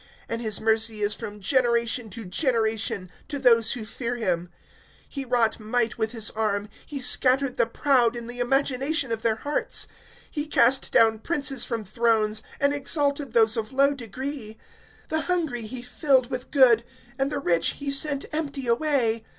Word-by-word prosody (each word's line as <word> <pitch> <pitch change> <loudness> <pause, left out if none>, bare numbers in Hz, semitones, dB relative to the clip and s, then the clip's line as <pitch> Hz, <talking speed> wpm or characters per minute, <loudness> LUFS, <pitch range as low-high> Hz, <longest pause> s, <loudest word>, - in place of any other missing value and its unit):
(50)And 230 - -3
his 220 -3 +1
mercy 220 -1 +2
is 205 0 +2
from 210 0 -7
generation 235 +1 +1
to 220 +3 -9
generation, 220 - 0 0.2
to 290 - -4
those 230 -4 +4
who 240 -5 -5
fear 235 +2 -4
him. 180 -7 -2 0.7
(51)He 270 -3 -5
wrought 235 -3 +2
might 230 +2 -1
with 220 0 -1
his 225 -3 -2
arm; 210 -1 -2 0.2
he 285 - -6
scattered 255 +1 +3
the - - +2
proud 245 -1 +2
in 235 -1 -6
the 245 +1 -8
imagination 270 +2 0
of 225 -1 -2
their 225 -1 +1
hearts. 290 +6 -1 0.5
(52)He 300 0 -3
cast 255 +3 +3
down 220 -1 +4
princes 275 -2 0
from 230 -3 -3
thrones, 220 0 +1 0.2
and 280 0 +2
exalted 285 -2 0
those 225 0 +5
of 225 +1 -3
low 275 +1 +3
degree. 250 -2 -7 0.5
(53)The 315 0 +1
hungry 310 -11 -1
he 240 +2 -7
filled 260 0 +1
with 255 0 -5
good, 245 -5 +5 0.4
and 270 +1 0
the 295 - -2
rich 170 -11 +1
he 280 -1 -4
sent 280 0 0
empty 285 -4 -3
away. 235 -3 +1
240 Hz, 165 wpm, -25 LUFS, 220-275 Hz, 0.7 s, those